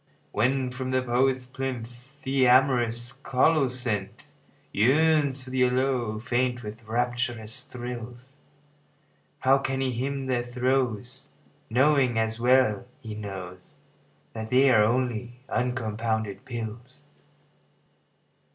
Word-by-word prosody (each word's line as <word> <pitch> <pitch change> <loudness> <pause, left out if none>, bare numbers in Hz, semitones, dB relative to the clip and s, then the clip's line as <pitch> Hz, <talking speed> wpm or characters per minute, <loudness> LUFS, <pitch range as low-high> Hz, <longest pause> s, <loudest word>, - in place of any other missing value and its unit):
When 125 +3 +1
from 130 0 -4
the 130 0 +1
poet's 130 +1 +1
plinth 125 +1 -6
The 135 -2 +2
amorous 120 -2 +3
colocynth 130 -6 0 0.4
Yearns 140 +3 +3
for 130 - -9
the 130 -1 +3
aloe, 125 -3 0
faint 125 +1 -1
with 110 +2 -8
rapturous 120 0 -2
thrills, 120 +1 -8 1.1
How 135 +1 +4
can 135 -1 -2
he 135 -1 0
hymn 135 +3 -3
their 130 -2 0
throes 125 +1 -1 0.4
Knowing, 130 -1 +3
as 110 0 0
well 125 -2 +3
he 115 -6 -7
knows, 95 -4 -8 0.6
That 110 -1 -6
they 130 +2 +5
are 110 -3 +6
only 120 +1 -1
uncompounded 110 -4 -2
pills? 120 +1 -7
125 Hz, 105 wpm, -26 LUFS, 115-130 Hz, 1.1 s, are